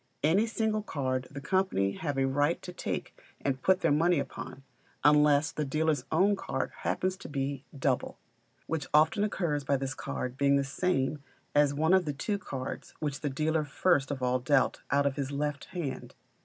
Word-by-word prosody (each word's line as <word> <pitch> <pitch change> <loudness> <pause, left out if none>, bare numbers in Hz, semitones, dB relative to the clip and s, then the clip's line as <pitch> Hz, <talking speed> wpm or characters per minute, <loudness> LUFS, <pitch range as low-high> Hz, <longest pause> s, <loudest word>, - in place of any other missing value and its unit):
Any 190 +9 +4
single 220 -1 0
card 130 -8 -2
the 140 - -7
company 165 - +1
have 145 +4 -3
a 135 - +3
right 145 +5 +1
to 180 - -7
take - - -4 0.2
and 135 -2 -2
put 190 +4 +3
their 165 - +3
money 170 +4 +3
upon, 140 -1 -5 0.4
unless 150 0 +5
the 150 - -2
dealer's 150 -1 0
own 190 +6 +4
card 135 -8 -3
happens 185 0 -1
to - - -10
be 140 -1 -3
double, 135 -2 0 0.5
which 155 -4 -3
often 160 +8 +4
occurs 170 -8 -1
by 140 +1 +1
this 135 0 -3
card 125 -3 -4
being 140 0 +4
the 140 - +2
same 140 0 0 0.3
as 145 -1 +4
one 160 +5 +3
of 190 -2 +4
the 145 - -2
two 200 +8 -2
cards 135 -8 -6
which 145 -2 -2
the 145 - -2
dealer 155 +3 0
first 145 -1 +1
of 135 -3 -3
all 125 0 +2
dealt 135 +1 +2
out 140 +1 +3
on 140 - +2
his 140 -1 -3
left 145 0 -2
hand. 145 -8 -5
145 Hz, 185 wpm, -30 LUFS, 135-165 Hz, 0.5 s, unless